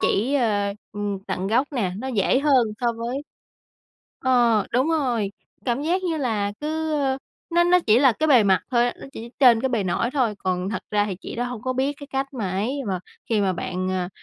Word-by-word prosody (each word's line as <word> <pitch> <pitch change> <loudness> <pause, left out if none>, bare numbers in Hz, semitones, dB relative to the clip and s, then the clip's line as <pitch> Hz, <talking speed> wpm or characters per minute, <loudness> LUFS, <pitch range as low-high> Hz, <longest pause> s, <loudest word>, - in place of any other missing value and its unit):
chỉ, 250 +8 +1
a, 205 -6 +1 0.2
ừm, 205 -1 -3
tận 185 - -2
gốc 240 +7 +2
nè, 205 -9 -1
nó 260 +4 -4
dễ 230 0 +2
hơn 275 -5 +4
so 240 -1 +1
với 235 +3 -4 1.1
Ờ, 240 -5 +3
đúng 255 +6 +2
rồi, 245 -11 0 0.3
cảm 245 +2 0
giác 350 +5 0
như 340 -3 -1
là 220 -8 -1
cứ, 315 +1 -2
ơ, 270 -3 0 0.3
nó 345 +1 +4
nó 360 +1 +5
chỉ 220 +1 +6
là 265 -2 +5
cái 310 +8 -1
bề 255 -7 +6
mặt 190 -2 +4
thôi 240 -1 +3
á, - - -4
nó - - -8
chỉ 235 -3 -8
trên 245 -4 +6
cái 265 - 0
bề 230 -6 0
nổi 210 +6 0
thôi, 250 -7 +1
còn 185 0 -2
thật - - -3
ra 205 0 +2
thì 190 - -4
chị - - -7
đó 240 - -1
hông 245 -3 -5
có 255 0 -1
biết 265 +3 0
cái 285 - -8
cách 270 0 -3
mà 205 -7 -2
ấy 220 +10 -1
mà 185 -2 -1 0.3
khi 220 -3 +2
mà 195 -2 +2
bạn, 185 +1 -3
à, 185 -1 -1
240 Hz, 230 wpm, -23 LUFS, 205-270 Hz, 1.1 s, chỉ